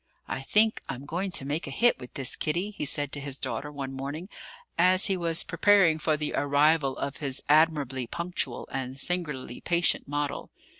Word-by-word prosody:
"I - - -4
think 215 +10 +3
I'm 135 0 -5
going 175 +6 -3
to 135 - 0
make 150 +4 -3
a - - -4
hit 240 0 +3
with 125 - -11
this, 135 -3 -1
Kitty," 175 +7 -1
he 200 - -4
said 145 -1 0
to 145 - -4
his 140 -1 -4
daughter 145 +1 -4
one 135 -2 -6
morning, 145 +7 -6 0.5
as 185 +2 +4
he 195 - +1
was 170 -2 +1
preparing 195 -6 +4
for 155 0 +1
the 150 -1 -2
arrival 145 0 +2
of 140 - -4
his 140 -3 -2
admirably 145 -5 +2
punctual 170 -7 -3
and 130 0 -4
singularly 150 -6 +1
patient 170 -2 +1
model. 145 0 -3
150 Hz, 185 wpm, -27 LUFS, 135-170 Hz, 0.5 s, as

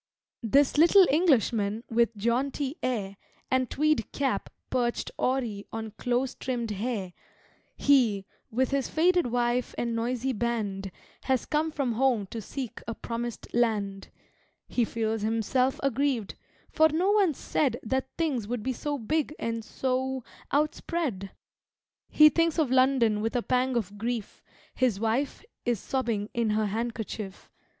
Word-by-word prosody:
This 275 +5 +3
little 365 +4 +8
Englishman 230 - +2
with 230 -1 +1
jaunty 260 +6 0
air 205 -6 -2 0.3
And 260 -2 +2
tweed 305 -5 +1
cap 275 -2 -1 0.2
perched 240 -2 0
awry 240 -6 0
on 220 -1 -5
close 245 +4 -1
trimmed 240 -4 -3
hair 205 -3 -3 0.6
He, 235 -9 +3 0.2
with 255 +4 0
his 275 -2 0
faded 350 0 +3
wife 240 +1 0
and 235 -1 -1
noisy 245 +3 -1
band, 205 -4 -2 0.3
Has 260 -3 +1
come 310 +1 0
from 280 -5 -1
Home 240 -3 +2
to 230 - -4
seek 255 +3 -6
a 230 - -3
promised 235 0 -5
land 205 -5 0 0.6
He 240 - +1
feels 225 -1 -2
himself 230 +4 +1
aggrieved, 270 -5 0 0.4
for 315 0 +5
no 350 +6 +2
one 395 -8 +3
said 260 -3 0
That 265 +3 -1
things 275 -10 0
would 240 -2 -3
be 260 - -1
so 290 +3 -3
big 305 +5 -1
and 230 -1 -3
so 260 +2 -2 0.3
outspread! 290 - -1 0.8
He 305 0 +8
thinks 330 0 +1
of 300 -6 +2
London 255 -5 +3
with 225 +2 -2
a 245 - +1
pang 255 0 +1
of 205 -2 -4
grief; 230 -1 -3 0.3
His 245 -6 +1
wife 230 - -1 0.2
is 240 -4 0
sobbing 230 -5 -2
in 235 -2 +1
her 215 0 +1
handkerchief. 220 -2 -4
240 Hz, 140 wpm, -28 LUFS, 220-270 Hz, 0.8 s, little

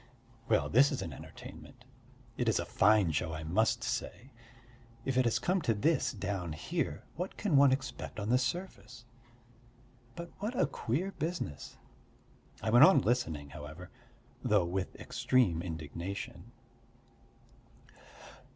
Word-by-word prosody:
Well, 75 - +3
this 135 - +5
is - - -2
an - - -6
entertainment, - - -12 0.5
it - - +1
is - - +2
a - - -1
fine 105 -4 +4
show, 80 +1 -1
I 80 0 -5
must 110 +8 +1
say! 115 0 -4 0.7
If 135 - -1
it 130 0 +3
has 115 0 +2
come 180 +10 +1
to 115 -7 +1
this 150 +10 +2
down 95 - -3
here, 80 - -3
what 180 +3 -4
can 200 -8 +1
one 140 -1 +7
expect 130 -4 -3
on 105 +1 -3
the 125 +1 +4
surface? 130 -5 -4 1.1
But 170 0 -7
what 220 +5 -3
a - - +5
queer 150 +6 -2
business! 160 - -4 0.9
I 110 - 0
went 120 +4 +8
on 190 - +6
listening, 80 - -1
however, 75 +5 -9 0.5
though - - +3
with 90 +2 -3
extreme 95 -11 +1
indignation. 85 +3 -6
115 Hz, 135 wpm, -32 LUFS, 85-135 Hz, 1.1 s, went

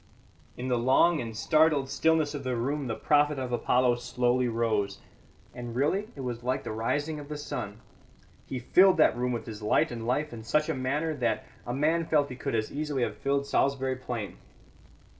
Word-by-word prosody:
In 125 - -4
the 125 -2 +1
long 145 +7 +4
and 115 -2 -6
startled 155 -1 +3
stillness 160 +1 +1
of 145 -2 -5
the 130 -1 -1
room 140 +3 -2
the 110 - -2
prophet 150 0 +2
of 130 -2 -4
Apollo 125 0 +2
slowly 125 +1 0
rose; 110 -4 0 0.6
and 120 -1 -7
really 160 +11 +1
it 140 - -7
was 120 -2 -4
like 125 +2 -1
the - - -5
rising 145 +8 -2
of 145 0 -10
the 150 - -4
sun. 105 -7 -6 0.7
He 130 - -4
filled 185 +9 +5
that 155 - +5
room 125 +1 -1
with 120 - -3
his 110 -2 -8
light 105 - +2
and 115 -1 -5
life 145 +3 0
in 115 - -7
such 150 +7 +1
a - - +1
manner 145 +5 -1
that 120 -3 0 0.2
a 120 - -2
man 160 +4 +1
felt 145 -2 +2
he - - -5
could 125 - -3
as 110 -1 -1
easily 145 -3 -2
have - - -2
filled 140 0 0
Salisbury 135 -1 +1
Plain. 120 -5 -5
130 Hz, 195 wpm, -28 LUFS, 120-150 Hz, 0.7 s, filled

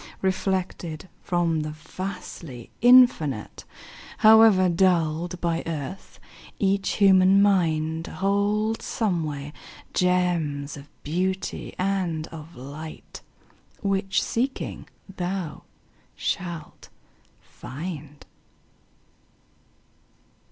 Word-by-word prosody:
Reflected 185 -3 -2
from 170 -3 0
the 155 0 -3
vastly 160 - -8
Infinite, 240 - +4 0.5
However 215 -4 +7
dulled 170 -1 +1
by 170 -1 0
earth, 165 +3 -6 0.4
each 195 0 +1
human 190 -1 +5
mind 165 -5 +2
Holds 205 +3 0
somewhere 155 -9 -2 0.4
gems 170 -6 +1
of 145 0 -12
beauty 185 +5 -2
and 180 -4 -1
of 165 +1 -10
light 145 +5 -9 0.6
Which, 195 -1 +1
seeking, 260 +4 -3 0.3
thou 180 -3 -4 0.5
shalt 170 -4 -4 0.5
find. 150 +1 -8
175 Hz, 75 wpm, -25 LUFS, 155-195 Hz, 0.6 s, However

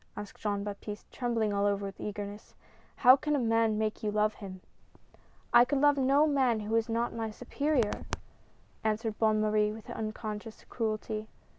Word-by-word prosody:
" - - -30
asked 205 -1 -8
Jean 205 -1 -1
Baptiste, 205 0 -7
trembling 230 -4 0
all 200 0 +2
over 200 0 0
with 195 -1 -7
eagerness. 205 0 -6 0.2
" - - -31
How 255 +1 +11
caii 300 +2 -1
a - - +1
man 225 -2 +2
make 215 0 -1
you 215 - -1
love 210 +1 +2
him? 190 -3 -9 0.5
" - - -31
"I 240 - +9
could 270 +2 0
love 290 0 +5
no 275 +3 +4
man 260 -7 +2
who 210 +1 -4
was 225 0 +2
not 235 +1 0
my 225 -1 -3
superior!" 250 +1 -1 0.8
answered 220 0 -1
Bonne 215 -1 +3
Marie 210 0 +2
with 215 0 -9
unconscious 215 0 -5
cruelty. 215 -1 -3
220 Hz, 180 wpm, -30 LUFS, 210-235 Hz, 0.8 s, How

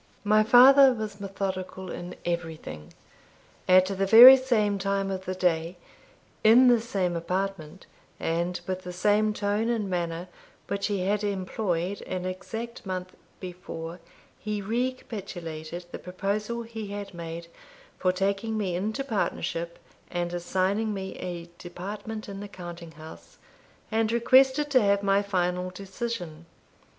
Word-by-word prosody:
My 215 +1 +4
father 260 +4 +7
was 215 -2 -6
methodical 190 -1 -4
in 175 +1 -7
everything. 165 - -5 0.8
At 185 0 +6
the 195 0 -1
very 240 +6 +11
same 220 -6 +1
time 195 0 -1
of 190 0 -5
the 185 - -3
day, 175 -1 0 0.7
in 245 +4 +7
the 240 -2 +4
same 190 -6 -1
apartment, 185 -1 -3 0.3
and 170 +2 -1
with 185 0 -3
the 180 -1 -7
same 210 +3 +2
tone 210 +2 -1
and 225 -4 -1
manner 175 -1 -3 0.4
which 200 0 -2
he 200 -3 -1
had 205 +2 0
employed 190 -2 -2
an 185 -1 -3
exact 225 +6 -6
month 185 -2 -5 0.3
before, 175 -2 -7 0.4
he 210 -1 -3
recapitulated 195 -8 -4
the - - -6
proposal 205 +6 -3
he 225 -2 -7
had 200 -1 -6
made 170 0 -7 0.5
for 185 - +2
taking 200 +4 -1
me 190 -5 -1
into 215 +8 -2
partnership, 170 -8 -2 0.3
and 175 0 -3
assigning 190 +5 0
me 190 -1 -5
a 175 -2 -5
department 205 +5 -7
in 195 -1 -7
the 205 - -6
counting 175 -3 -9
house, 160 - -13 0.5
and 220 0 +1
requested 265 +5 +4
to 255 -2 +5
have 200 -1 +2
my 195 0 +3
final 180 -2 -1
decision. 185 -4 -6
195 Hz, 135 wpm, -27 LUFS, 180-215 Hz, 0.8 s, very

